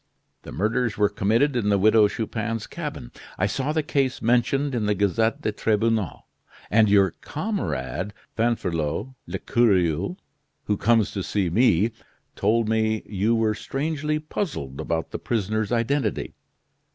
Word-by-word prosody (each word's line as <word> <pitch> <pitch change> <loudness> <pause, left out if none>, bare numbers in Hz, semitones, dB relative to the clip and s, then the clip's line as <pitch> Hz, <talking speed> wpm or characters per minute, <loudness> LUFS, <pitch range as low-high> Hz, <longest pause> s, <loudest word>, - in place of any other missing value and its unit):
The - - -10
murders 110 +3 0
were 105 -1 +3
committed 115 +8 +1
in 110 -4 +1
the 100 - +4
Widow 110 +2 +5
Chupin's 115 +1 -3
cabin. - - -6 0.3
I 95 - +1
saw 135 +8 -1
the 155 0 0
case 135 -3 0
mentioned 125 +4 +1
in 110 -4 0
the 105 - +2
'Gazette 105 +3 +1
des 110 - +1
Tribunaux,' 110 - 0 0.5
and 110 +1 +5
your 100 -3 +5
comrade, 105 - -3 0.2
Fanferlot 110 - -1
l'Ecureuil, 95 -6 +1 0.5
who 105 - 0
comes 115 -1 +3
to 100 - -3
see 95 -2 -1
me, 110 0 +3 0.4
told 115 0 +2
me 110 0 +1
you 105 +3 +1
were 110 -1 +2
strangely 150 +5 -2
puzzled 150 - -4
about 80 -1 -2
the - - -4
prisoner's 110 -1 -1
identity. 125 +4 0
110 Hz, 140 wpm, -24 LUFS, 100-120 Hz, 0.5 s, Widow